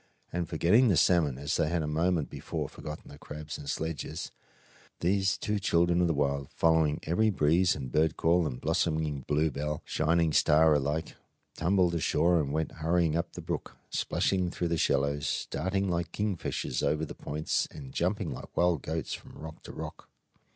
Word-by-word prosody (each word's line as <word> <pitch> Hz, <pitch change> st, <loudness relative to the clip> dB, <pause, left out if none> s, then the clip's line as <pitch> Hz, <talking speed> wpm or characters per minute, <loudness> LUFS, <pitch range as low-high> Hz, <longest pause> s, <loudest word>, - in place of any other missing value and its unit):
And 85 Hz, -1 st, -2 dB
forgetting 90 Hz, +10 st, +4 dB
the 95 Hz, -7 st, +3 dB
salmon, 80 Hz, -8 st, +3 dB
as 70 Hz, +3 st, -1 dB
they 75 Hz, -, +1 dB
had 85 Hz, -1 st, 0 dB
a -, -, -3 dB
moment 80 Hz, +1 st, 0 dB
before -, -, -4 dB
forgotten 75 Hz, 0 st, -9 dB
the 70 Hz, -, -12 dB
crabs 75 Hz, +1 st, -7 dB
and 70 Hz, -, -7 dB
sledges, 80 Hz, +1 st, -4 dB, 0.7 s
these 95 Hz, +2 st, +2 dB
two 105 Hz, 0 st, -1 dB
children 85 Hz, -2 st, +2 dB
of 90 Hz, -, +3 dB
the 80 Hz, -, +1 dB
wild, 70 Hz, -1 st, 0 dB
following 80 Hz, -2 st, +2 dB
every 110 Hz, +7 st, +2 dB
breeze 90 Hz, 0 st, +3 dB
and 65 Hz, -4 st, -6 dB
bird 80 Hz, +3 st, +2 dB
call 85 Hz, 0 st, +3 dB
and 60 Hz, -, -5 dB
blossoming 80 Hz, -3 st, 0 dB
bluebell 75 Hz, 0 st, 0 dB
and 75 Hz, -, -7 dB
shining 80 Hz, 0 st, +1 dB
star 80 Hz, +2 st, +5 dB
alike, 75 Hz, +3 st, -1 dB, 0.4 s
tumbled 90 Hz, +1 st, +2 dB
ashore 85 Hz, +1 st, +2 dB
and 70 Hz, -2 st, -3 dB
went 80 Hz, 0 st, -1 dB
hurrying 80 Hz, -1 st, +2 dB
up 85 Hz, -, -2 dB
the -, -, -7 dB
brook, -, -, -5 dB
splashing 95 Hz, -2 st, 0 dB
through 85 Hz, -1 st, -2 dB
the 85 Hz, -, +1 dB
shallows, 70 Hz, +1 st, +1 dB
darting 95 Hz, +6 st, 0 dB
like 85 Hz, -1 st, -1 dB
kingfishers 100 Hz, -10 st, -2 dB
over 75 Hz, +2 st, +1 dB
the -, -, -8 dB
points, 75 Hz, +2 st, -2 dB
and 65 Hz, -3 st, -10 dB
jumping -, -, -1 dB
like -, -, -9 dB
wild 85 Hz, -4 st, +3 dB
goats 80 Hz, 0 st, -3 dB
from -, -, -9 dB
rock 80 Hz, 0 st, -9 dB
to -, -, -9 dB
rock. -, -, -8 dB
80 Hz, 180 wpm, -29 LUFS, 75-85 Hz, 0.7 s, star